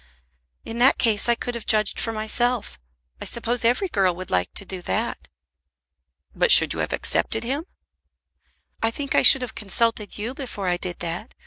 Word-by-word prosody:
"In 230 +1 -6
that 260 +3 +5
case 225 -1 +1
I 235 - +4
could 245 +1 -6
have 235 -2 -8
judged 215 -2 +2
for 225 - -3
myself. 225 - -2 0.4
I - - -6
suppose 235 +1 -2
every 245 - +1
girl 195 - 0
would 185 +1 -9
like 90 -1 0
to 200 - -4
do 185 -1 -7
that." - - -3 1.1
"But - - +2
should - - +8
you - - -7
have - - -2
accepted 225 +1 -1
him?" 275 +7 -3 1.2
"I 225 - +1
think 280 +4 -4
I - - +4
should 270 - +8
have 245 - -6
consulted 215 +1 -2
you 220 +4 -5
before 240 -8 -6
I 175 0 0
did 175 0 -5
that. 175 +7 -6
225 Hz, 185 wpm, -22 LUFS, 195-240 Hz, 1.2 s, should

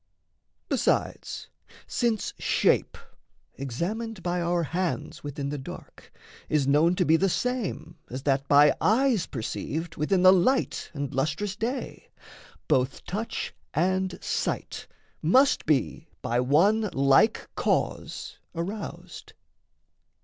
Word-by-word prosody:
Besides, - - -1 0.4
since 230 -3 -1
shape - - +2 0.6
examined 180 - -4
by 175 0 -1
our 170 0 +1
hands 165 -1 -3
Within 140 -1 -4
the 145 0 -4
dark 130 - -11 0.4
is 150 -3 +2
known 150 +6 +4
to 180 - +1
be 160 +1 +5
the 195 +3 +2
same 220 -7 -2
As 130 +2 -6
that 140 -1 +1
by 145 +1 +6
eyes 230 -2 +3
perceived 155 +7 -4
within 180 +5 +1
the 185 0 +9
light 225 +9 +1
And 140 -1 -4
lustrous 155 +9 -1
day, 245 +5 -4 0.6
both 130 +1 +1
touch 215 +5 -4 0.2
and 185 +3 +1
sight - - -3 0.3
must 260 - +4
be 155 +2 0 0.2
By 120 +1 0
one 195 - +3
like 135 +11 +3
cause - - -2 0.2
aroused. 195 +6 -6
170 Hz, 115 wpm, -27 LUFS, 145-205 Hz, 0.6 s, the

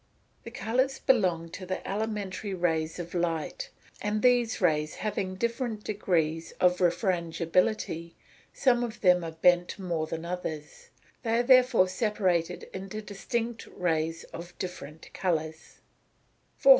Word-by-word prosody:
_ - - -37
The - - -5
colours 245 +4 0
belong 180 -10 +2
to 185 +3 -8
the 185 0 -4
elementary 205 -1 -3
rays 160 -3 0
of 175 -1 -6
light; 175 - -2 0.3
and 210 +1 -1
these 245 -2 +4
rays 155 -4 +1
having 200 -3 -2
different 235 0 -2
degrees 165 -6 0
of 180 0 +3
refrangibility, 170 -1 +1 0.4
some 245 -2 +3
of 235 -1 -5
them 180 -2 +5
are 165 -1 -5
bent 175 +2 +3
more 170 -5 -2
than 165 +1 -5
others; 160 -4 -5 0.3
they 230 -2 +1
are 240 - +3
therefore 250 -6 +6
separated 185 -4 0
into 195 +3 -5
distinct 225 +3 -3
rays 165 -2 -1
of 175 +1 -8
different 170 -4 -7
colours. 160 -3 -2
185 Hz, 130 wpm, -29 LUFS, 165-215 Hz, 0.4 s, therefore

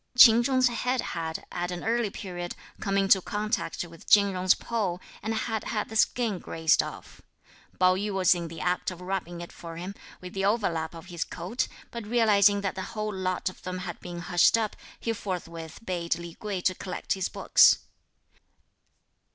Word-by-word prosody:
Ch'in 235 -1 +9
Chung's 255 0 +3
head 250 +2 -1
had, 160 -5 -3
at 175 0 -2
an 175 -1 -5
early 230 -1 +1
period, 175 -3 -6 0.2
come 195 -1 0
into 195 -1 +5
contact 215 +3 -2
with 165 -2 -12
Chin 200 -1 +6
Jung's 185 0 +3
pole 200 -7 -2 0.2
and 220 - -2
had 225 0 -2
had 215 -2 -2
the 220 - -8
skin 220 -3 +2
grazed 160 -1 +2
off. - - -9 0.6
Pao 185 0 +6
yü 200 +3 -2
was 190 -2 +4
in 170 -2 -4
the 165 0 -8
act 180 0 0
of 180 -2 -8
rubbing 180 -2 -4
it 175 - -8
for 165 -1 -9
him, 180 +3 -5 0.3
with 180 0 -9
the 195 - -2
overlap 180 -7 0
of 165 - -10
his 170 - -1
coat, 240 - -3 0.2
but 235 -3 -6
realising 210 -3 +4
that 195 -1 -1
the 190 - -5 0.2
whole 215 0 -2
lot 185 -1 -2
of 185 - -4
them 185 0 -4
had 180 -1 -6
been 175 -1 -7
hushed 175 +5 +4
up, 220 -2 -1 0.2
he 230 - -1
forthwith 170 -6 -6
bade 170 -3 -1
Li 170 -1 -8
Kuei 200 -2 -4
collect 185 0 -1
his 190 -2 -2
books. - - +6
190 Hz, 185 wpm, -28 LUFS, 175-215 Hz, 0.6 s, Ch'in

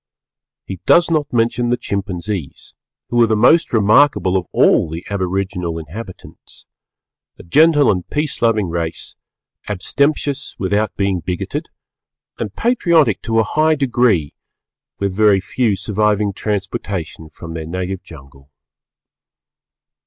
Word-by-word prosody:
He 95 -2 -7
does 170 0 +5
not 150 -3 0
mention 120 +1 +1
the 120 +1 +1
Chimpanzees, 95 - -5 0.4
who 120 0 +2
are 115 - +5
the 110 - +1
most 140 +10 +4
remarkable 110 -2 +3
of 90 -2 -1
all - - +3
the 80 +2 -7
aboriginal 95 -3 -2
inhabitants, 90 +5 -10 0.7
a - - -12
gentle 150 - +4
and 90 -3 -4
peace 150 -1 -2
loving 110 -4 +2
race, 85 -1 -4 0.5
abstemious 140 +7 -1
without 100 +2 -1
being 100 -2 0
bigoted, 90 +1 -4 0.7
and 105 - -5
patriotic 170 - +2
to 115 0 -1
a 115 - +4
high 155 +8 +2
degree, 120 - +1 0.7
very 100 +1 +3
few 110 +2 0
surviving 105 +1 0
transportation 95 -5 -4
from 80 +1 -10
their 80 -1 -6
native 95 +2 -4
jungle. 70 -3 -15
100 Hz, 120 wpm, -18 LUFS, 90-120 Hz, 0.7 s, does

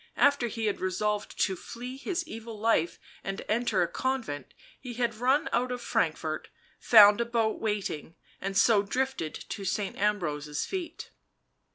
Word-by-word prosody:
after 285 -4 +4
he 225 -1 -3
had 205 - -1
resolved 205 +3 -1
to 190 - +2
flee 245 +7 -7
his 345 +5 -3
evil 225 -2 -7
life 210 -6 +2 0.3
and 195 0 -4
enter 215 -4 +2
a - - 0
convent, 230 - -3 0.2
he 250 -3 -7
had 235 -1 0
run 255 +6 +2
out 250 +1 +1
of 250 - -3
Frankfort, - - -1 0.3
found 210 -1 +8
a - - +1
boat 230 -2 0
waiting 205 -7 -2
— - - -30
and 195 0 -2
so 215 -1 +5
drifted 225 - -2
to 200 - -6
Saint 195 +1 -1
Ambrose's 150 -8 -1
feet. 355 -4 -5
220 Hz, 160 wpm, -29 LUFS, 195-245 Hz, 0.3 s, found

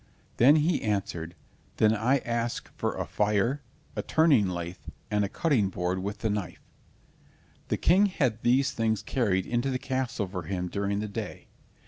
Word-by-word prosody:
Then 135 +6 +7
he 160 +2 +2
answered, 90 -5 -2 0.4
"Then 110 0 +4
I 120 +6 +2
ask 120 0 -2
for - - -2
a - - -2
fire, 105 +7 +1 0.3
a - - -1
turning 150 - +4
lathe, 85 0 -5 0.3
and 105 0 +2
a 100 - -1
cutting 125 - +1
board 90 0 -2
with 100 +2 -5
the 110 - 0
knife." 100 -4 -5 1.0
The - - 0
King 190 +5 +4
had 130 - 0
these 130 +3 +3
things 110 -2 0
carried 100 -7 0
into 120 +3 0
the 130 - 0
castle 130 -6 -2
for 90 0 -5
him 90 +1 -3
during 100 +1 -1
the 105 - -3
day. 100 - -6
110 Hz, 165 wpm, -28 LUFS, 100-130 Hz, 1.0 s, Then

